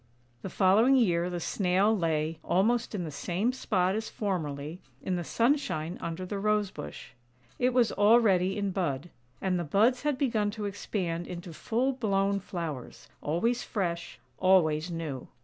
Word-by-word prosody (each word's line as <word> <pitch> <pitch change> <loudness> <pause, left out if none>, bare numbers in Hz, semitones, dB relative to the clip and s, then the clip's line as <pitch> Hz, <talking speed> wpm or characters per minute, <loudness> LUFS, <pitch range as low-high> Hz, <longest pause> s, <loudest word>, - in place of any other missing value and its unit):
The - - -5
following 210 +9 +4
year 180 -8 +2
the 175 -1 -3
Snail 195 +4 +2
lay, 160 -3 -1
almost 230 +5 +1
in 185 - -2
the 160 - -5
same 185 - -1
spot 190 -7 +1
as 220 +1 -3
formerly, 160 -5 -3 0.2
in 185 - -1
the 175 - -2
sunshine 210 - 0
under 170 +2 -4
the 200 +2 -4
Rose 210 -1 +1
bush; 75 0 -8 0.5
it 250 +1 +3
was 245 -3 +3
already 205 -3 +4
in 200 -1 -1
bud, 170 -4 -2 0.3
and 185 -2 +1
the - - -1
buds 215 - +3
had 295 -3 0
begun 230 -6 +1
to 210 - -3
expand 185 -4 -3
into 175 -1 -7
full 245 +10 0
blown 200 -5 +1
flowers, 170 - -6
always 230 +11 0
fresh, 170 -5 -3 0.2
always 175 -4 +3
new. 160 -6 -5
190 Hz, 155 wpm, -29 LUFS, 170-215 Hz, 0.5 s, following